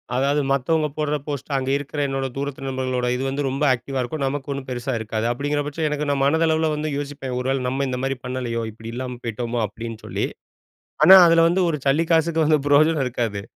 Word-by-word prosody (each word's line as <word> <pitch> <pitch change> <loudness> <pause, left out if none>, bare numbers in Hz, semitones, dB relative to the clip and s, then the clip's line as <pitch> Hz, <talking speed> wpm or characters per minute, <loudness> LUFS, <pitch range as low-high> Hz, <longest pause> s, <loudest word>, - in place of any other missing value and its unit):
அதாவது 140 +3 +2
மத்தவங்க 150 +4 +1
போடுற 150 -1 0
போஸ்ட்டு, 145 0 -4
அங்க 135 0 -2
இருக்கிற 145 +1 -6
என்னோட 135 0 -2
தூரத்து 140 -1 -4
நண்பர்களோட 130 -1 -1
இது 125 - -3
வந்து 140 +1 -2
ரொம்ப 135 +3 -2
ஆக்டிவா 130 +2 -4
இருக்கும். 140 +4 -3
நமக்கு 135 +1 -3
ஒண்ணும் 135 -1 -6
பெருசா 125 +1 -3
இருக்காது. 110 0 -3
அப்பிடிங்கிற 145 +4 -1
பட்சம் 155 +2 -2
எனக்கு 150 0 -2
நான் 140 -1 +1
மனதளவுல 160 +1 +2
வந்து 150 +1 -2
யோசிப்பேன். 140 -3 -5
ஒரு 125 - -3
வேள 135 -1 -1
நம்ம 135 +2 -1
இந்தமாரி 130 +1 -2
பண்ணலயோ! 125 -2 -3
இப்பிடி 110 +1 -9
இல்லாம 125 0 -5
போயிட்டோமோ! 120 +1 -3
அப்பிடின்னு 115 +1 -8
சொல்லி, - - -2 0.8
ஆனா 190 - +10
அதில 165 0 +5
வந்து 175 +3 +2
ஒரு 155 - -1
சல்லி 145 +4 +3
காசுக்கு 165 0 +3
வந்து 155 0 +4
பிரயோஜனம் 150 +1 +4
இருக்காது. 115 -5 -2
135 Hz, 195 wpm, -22 LUFS, 125-150 Hz, 0.8 s, ஆனா